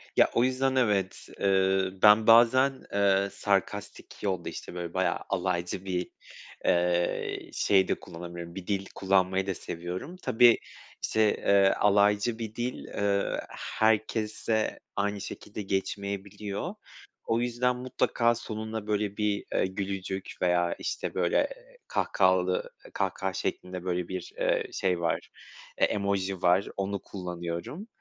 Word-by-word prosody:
Ya, - - +5
o 115 - +3
yüzden 130 +1 +1
evet. 105 -7 +1
Iıı, 95 -1 +2
ben 105 +1 +7
bazen, 125 +4 +6 0.2
ııı, 100 -1 +3
sarkastik 100 +1 -2
yol 95 -4 -1
da - - -2
işte - - -8
böyle 85 -1 -5
bayağı 95 0 +1
alaycı 90 +1 -1
bir, 90 -1 -2 0.6
ııı, 85 0 0
şey 95 -2 +3
de - - -1
kullanabiliyorum, 85 0 -8
bir 95 -2 -7
dil 100 -1 -1
kullanmayı 95 0 +2
da 95 - 0
seviyorum. 90 - -6
Tabii, 120 0 +6 0.5
işte, 110 -1 +2
ııı, 100 -1 +5
alaycı 105 +3 +3
bir 110 -1 -5
dil, 120 +1 -4
ııı, 100 -1 0 0.4
herkese 110 0 +1 0.2
aynı 100 0 -1
şekilde 105 0 -7
geçmeyebiliyor. 100 +1 -3 0.5
O 115 +1 +1
yüzden 125 +1 +1
mutlaka 120 -1 +1
sonuna 110 -1 -5
böyle 105 -1 -1
bir, 105 -1 0
eee, - - +2
gülücük 95 0 -4
veya, 90 -1 +2
işte, - - -3
böyle, - - +1
eee, - - -3
kahkahalı 95 -1 +2 0.2
kahkaha 95 0 -1
şeklinde 90 0 -4
böyle 90 -1 -1
bir, 95 -2 -5
ııı, - - 0
şey 90 -2 0
var, 85 - -1 0.5
e - - +5
emoji 100 -2 -1
var. 90 +2 +3
Onu 100 0 -1
kullanıyorum. 90 - -6
100 Hz, 130 wpm, -28 LUFS, 95-110 Hz, 0.6 s, ben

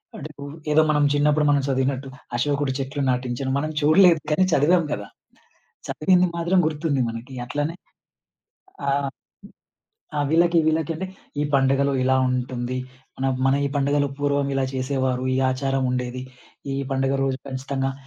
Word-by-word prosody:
అంటే 150 - -6
ఇప్పుడు 145 0 -8 0.2
ఏదో 155 +1 +6
మనం 150 -1 +3
చిన్నప్పుడు 150 +1 +3
మనం 145 -1 +3
చదివినట్టు 135 0 -1 0.3
అశోకుడి 140 +2 0
చెట్లు 135 +2 -3
నాటించెను, 125 +1 -2
మనం 155 +2 -2
చూడలేదు 165 +3 +6
కానీ, 150 +5 +3
చదివాం 170 +5 +4
గదా! 100 -1 -3 0.8
చదివింది 180 +3 +3
మాత్రం 170 +2 +2
గుర్తుంది 150 -3 -1
మనకి. 115 +4 -8
అట్లనే 145 +6 -2 1.1
ఆ! - - +3 1.3
ఆ! - - 0
వీళ్ళకి, 170 +1 +4
వీళ్ళకి 160 0 0
అంటే, 190 +4 -4 0.4
ఈ - - 0
పండుగలు 135 +1 +3
ఇలా 130 0 +3
ఉంటుంది. 125 0 -2 0.4
మనం 135 0 +1 0.2
మన 135 - +4
ఈ - - -1
పండుగలు 145 +1 +1
పూర్వం 145 -1 +1
ఇలా 135 -1 +1
చేసేవారు, 130 -1 -1
ఈ - - +1
ఆచారముండేది. 130 -1 -1 0.5
ఈ - - -2 0.2
పండుగ 135 0 +1
రోజు 135 -1 -1
ఖచ్చితంగా 135 0 -2
140 Hz, 140 wpm, -23 LUFS, 130-150 Hz, 1.3 s, ఏదో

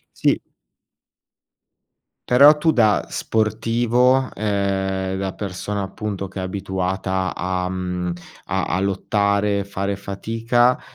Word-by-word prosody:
Sì. - - +2 1.9
Però 140 +5 +7
tu 160 +2 +3
da 110 -7 +3
sportivo, 120 +4 +1
ehm, 95 -2 -1
da 95 -1 -2
persona 100 +1 -4
appunto 100 0 -4
che 95 - -7
è - - -2
abituata, 95 -1 -2
a 90 0 -2
mhmm, 90 -1 -3 0.3
a - - -1
a 95 - -1
lottare, 100 +1 +1
fare 100 0 -3
fatica, 115 +5 +1
100 Hz, 105 wpm, -21 LUFS, 95-110 Hz, 1.9 s, Però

